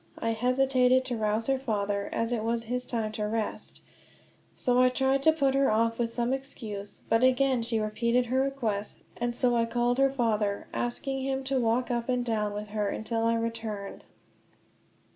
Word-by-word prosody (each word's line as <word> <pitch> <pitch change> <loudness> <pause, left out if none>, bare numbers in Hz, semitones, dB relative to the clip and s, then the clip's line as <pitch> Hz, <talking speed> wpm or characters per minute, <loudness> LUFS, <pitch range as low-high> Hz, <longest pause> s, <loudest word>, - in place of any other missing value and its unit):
I 230 - -1
hesitated 255 +2 +3
to 250 - -2
rouse 215 0 0
her 270 +1 +1
father, 205 -5 -1
as 230 +1 -1
it 230 -3 -1
was 230 +1 0
his 250 +2 -3
time 225 -3 -1
to 215 -1 -2
rest; 220 0 -4 0.7
so 250 -1 +2
I 255 - +6
tried 265 +1 +1
to 315 - +6
put 280 -4 +1
her 275 0 +3
off 230 +1 +1
with 230 -1 0
some 240 +2 0
excuse; 215 -7 -6
but 225 +2 +2
again 260 -1 +3
she 230 -1 -1
repeated 235 +3 +1
her 255 +2 0
request, 230 -7 -2
and 240 0 -2
so 245 -1 +2
I 230 -1 +3
called 240 +2 +1
her 275 0 +5
father, 215 -6 0
asking 270 +3 -2
him 270 0 -1
to 265 0 0
walk 235 +2 +1
up 235 0 -2
and 250 -1 +1
down 210 -3 -1
with 210 0 -5
her 210 -1 -1
until 225 +2 -2
I 230 0 +3
returned. 225 -3 -4
235 Hz, 185 wpm, -28 LUFS, 220-255 Hz, 0.7 s, I